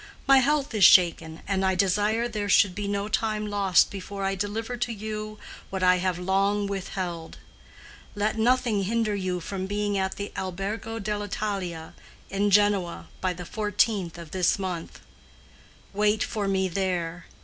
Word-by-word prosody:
My 270 0 +7
health 280 0 +1
is 210 -3 +2
shaken, 165 -3 +5
and 195 -1 0
I 190 0 +2
desire 205 +5 +1
there 210 -3 -3
should 190 -1 +5
be 205 +1 -4
no 200 0 -1
time 215 0 -1
lost 200 -3 +3
before 200 0 -6
I 195 0 0
deliver 210 +5 -3
to 240 0 -2
you 215 0 -5 0.3
what 190 -1 -3
I 180 0 +5
have 180 -1 -1
long 195 +3 +1
withheld. 185 -4 -5 0.8
Let 210 +1 0
nothing 230 -3 +2
hinder 225 +1 0
you 185 -2 -2
from 190 +2 -5
being 205 0 -1
at 190 0 -1
the 200 0 -5
Albergo 200 +5 -4
dell' 210 -1 -3
Italia 195 -6 -4 0.4
in 200 +1 +1
Genoa 200 -3 +2
by 185 -1 0
the 180 0 -8
fourteenth 205 -3 0
of 165 -2 -10
this 185 0 +2
month. 180 -4 -5 0.9
Wait 210 +1 +2
for 210 -3 -2
me 190 -1 +1
there. 175 -2 -2
200 Hz, 160 wpm, -26 LUFS, 185-210 Hz, 0.9 s, My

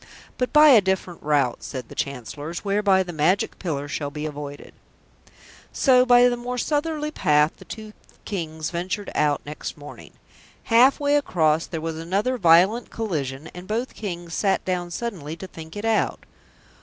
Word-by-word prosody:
"But 250 - 0
by 300 0 +7
a 240 -6 +8
different 190 -2 -2
route," 145 -5 +1
said 130 -3 -6
the - - -11
Chancellors, 145 - -5
"whereby 200 -1 +3
the 175 -1 -8
Magic 180 +8 +1
Pillar 145 -6 -3
shall 145 0 -3
be 150 +1 -6
avoided." 145 -1 -7 1.0
So 255 -2 +4
by 245 0 +7
the 245 - +1
more 245 +1 -5
southerly 300 +3 -1
path 150 - +2
the 190 - -14
two 215 +4 -9 0.3
Kings 160 -6 -4
ventured 185 +4 -3
out 150 -1 +1
next 150 +2 -6
morning. 145 0 -12 0.5
Half 245 +4 +5
way 290 0 +3
across 160 - +1
there 160 - -5
was 165 0 -4
another 200 +10 -1
violent 185 +6 +4
collision, 155 -9 -4
and 180 +1 -10
both 235 +4 -2
Kings 175 -5 -6
sat 195 +2 0
down 180 -1 -2
suddenly 175 -6 -5
to 190 - -8
think 160 -3 -11
it 205 - -4
out. 225 -1 0
180 Hz, 165 wpm, -23 LUFS, 155-225 Hz, 1.0 s, a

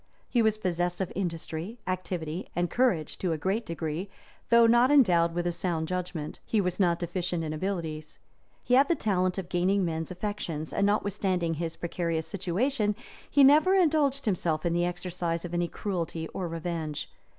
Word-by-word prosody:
[*] - - -38
He 240 - +2
was 220 -1 +2
possessed 175 -3 -1
of 190 - -2
industry, 170 +2 -4
activity, 180 -2 -3
and 175 0 0
courage, 230 - +1
to 180 -3 0
a - - -2
great 195 +8 -1
degree; 165 +3 -3 0.4
though 235 0 +7
not 240 +2 +5
endowed 175 -12 +4
with 175 0 -1
a 175 - +1
sound 170 -2 -2
judgment, 175 -4 -4
he 220 - 0
was 180 -1 -1
not 175 -3 +3
deficient 175 0 -2
in 155 -1 -3
abilities; 160 -3 -4 0.5
he 250 - 0
had 270 +3 +6
the 340 - +2
talent 185 - 0
of 190 -3 -4
gaining 185 +2 +1
men's 160 -1 -3
affections, 180 -5 -4
and 200 - +2
notwithstanding 190 -4 0
his 165 +1 -3
precarious 170 -2 -2
situation, 205 +4 0 0.3
he 285 - +5
never 305 +8 +6
indulged 300 -6 +2
himself 175 -6 0
in 170 - +1
the 175 0 +2
exercise 175 -1 -3
of 175 - -7
any 175 0 +1
cruelty 170 -4 -3
or 185 - -4
revenge. 165 -2 -4
180 Hz, 175 wpm, -28 LUFS, 165-205 Hz, 0.5 s, though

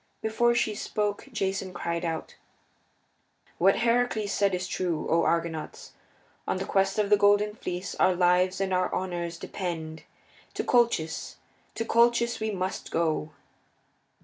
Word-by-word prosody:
Before 235 +2 +2
she 220 -2 +1
spoke 210 +2 -2
Jason 195 -4 -2
cried 170 0 -2
out: 165 -2 -3 1.3
"What 195 +3 +5
Heracles 235 -3 +1
said 200 -2 +2
is 180 0 -3
true, 175 -3 -2
O 165 +1 +3
Argonauts! 165 -2 -2 0.6
On - - 0
the 190 - -3
Quest 195 +1 +1
of 210 -1 0
the 210 - +7
Golden 205 +1 +3
Fleece 180 -3 -5
our 185 - +4
lives 180 +1 +3
and 195 -1 -1
our 185 0 +1
honors 175 -2 -3
depend. 165 -4 -5 0.5
To - - -1
Colchis 235 - +1 0.4
to 225 - -2
Colchis 235 0 +3
must 190 -1 -3
we - - -11
go!" 160 -2 0
190 Hz, 140 wpm, -27 LUFS, 170-210 Hz, 1.3 s, the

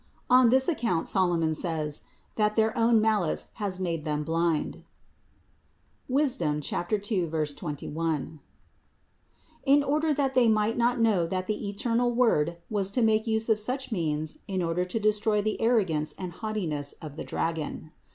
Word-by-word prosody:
On 250 -1 +7
this 260 +2 +4
account 230 - 0
Solomon 175 -4 +2
says, 155 -2 -2 0.3
that 210 -1 +1
their 220 +1 +2
own 230 -1 +4
malice 215 -6 0
has 190 -3 -2
made 170 -4 -2
them 150 -1 -1
blind 165 0 -1 1.4
(Sap. 165 - -2
2, 200 -4 -1
21), 155 0 -3 1.2
in 285 +1 +4
order 305 +3 +1
that 280 -2 0
they 250 -3 +4
might 215 +1 +2
not 240 +1 +2
know 210 -7 +3
that 185 +1 -2
the 210 0 -3
eternal 235 +4 0
Word 170 -10 +2
was 200 -3 -1
to 240 +4 +1
make 220 0 +2
use 220 0 +1
of 220 -2 +3
such 255 +5 -3
means 155 -5 -2
in 190 -3 -1
order 170 +2 0
to 180 +5 -3
destroy 215 0 +2
the 215 +1 -1
arro 225 -2 +3
gance 150 -2 -2
and 185 -2 -5
haughtiness 170 -9 -3
of 150 -3 -10
the - - -5
dragon. 160 -1 -3
200 Hz, 150 wpm, -27 LUFS, 165-225 Hz, 1.4 s, On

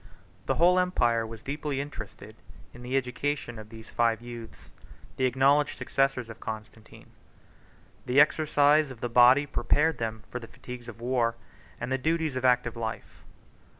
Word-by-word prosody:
—M.] - - -18 0.4
The - - +1
whole 180 +2 +5
empire 120 -11 +1
was 110 -1 -10
deeply 145 0 -3
interested 110 -6 -8 0.4
in 120 - -12
the 125 +2 -1
education 125 -1 -3
of 110 0 -11
these 110 0 -12
five 115 -2 +1
youths, 120 -1 -10 0.5
the 130 - +2
acknowledged 135 +3 +3
successors 135 -3 0
of 115 - -10
Constantine. 110 0 -9 1.0
The 125 +3 +4
exercise 150 0 +4
of 130 -4 -11
the 120 - -2
body 125 +4 +6
prepared 150 +2 +1
them 110 -1 -4
for 125 - -4
the 115 - -10
fatigues 125 0 -10
of 115 -1 -10
war 120 -2 +1 0.4
and 120 +2 -4
the 130 - +1
duties 160 0 0
of 130 - -3
active 125 -2 +2
life. 110 -1 -6
125 Hz, 160 wpm, -28 LUFS, 115-145 Hz, 1.0 s, body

